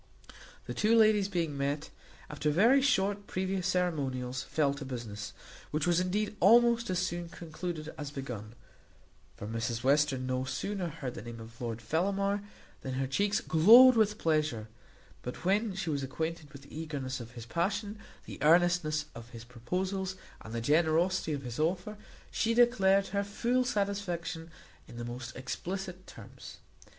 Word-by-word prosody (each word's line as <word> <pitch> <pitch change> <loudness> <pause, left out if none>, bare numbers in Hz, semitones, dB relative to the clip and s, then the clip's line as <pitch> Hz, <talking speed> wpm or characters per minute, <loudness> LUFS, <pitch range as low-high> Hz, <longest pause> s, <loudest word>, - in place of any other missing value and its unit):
The - - -5
two 220 +2 +3
ladies 215 -3 +5
being 165 -6 -1
met, 140 +2 -2 0.4
after 150 0 -2
very 230 - +5
short 205 -6 +1
previous 190 -1 -2
ceremonials, 135 -9 -1
fell 145 -3 0
to 140 0 -7
business, 110 -6 -6 0.4
which 155 +2 -1
was 175 -1 +3
indeed 205 +4 -1
almost 235 +3 +5
as 185 - 0
soon 175 -1 -2
concluded 165 -1 -6
as 145 -1 -4
begun; 120 -6 -7 0.8
for - - -7
Mrs 115 +2 -3
Western 140 -1 +2
no 130 0 -1
sooner 190 +7 -3
heard 145 -6 -5
the - - -7
name 115 +1 -8
of 115 +1 -12
Lord 115 -1 -4
Fellamar 195 - 0 0.4
than 130 -1 -4
her 135 +1 0
cheeks 200 +10 +1
glowed 235 +10 +8
with 215 -2 +3
pleasure; 155 - 0 0.5
but 125 +7 -7
when 200 +2 +1
she 175 -4 -2
was 140 -1 -1
acquainted 160 +3 -4
with 140 -2 -12
the 140 - -13
eagerness 145 -5 -4
of 120 0 -9
his 120 -2 -8
passion, 200 - -2 0.3
the - - -9
earnestness 165 -1 +3
of 115 0 -10
his 115 -2 -10
proposals, 185 +11 -3 0.3
and 110 - -10
the 115 0 -3
generosity 160 +5 +2
of 140 -1 -4
his 120 0 -6
offer, 180 +6 -1 0.4
she 230 0 +1
declared 200 -5 +4
her 200 +1 0
full 240 +5 0
satisfaction 200 -7 -2 0.4
in 120 - -11
the 120 - -5
most 120 +1 -7
explicit 185 +8 -5
terms. - - -11
165 Hz, 160 wpm, -31 LUFS, 130-195 Hz, 0.8 s, glowed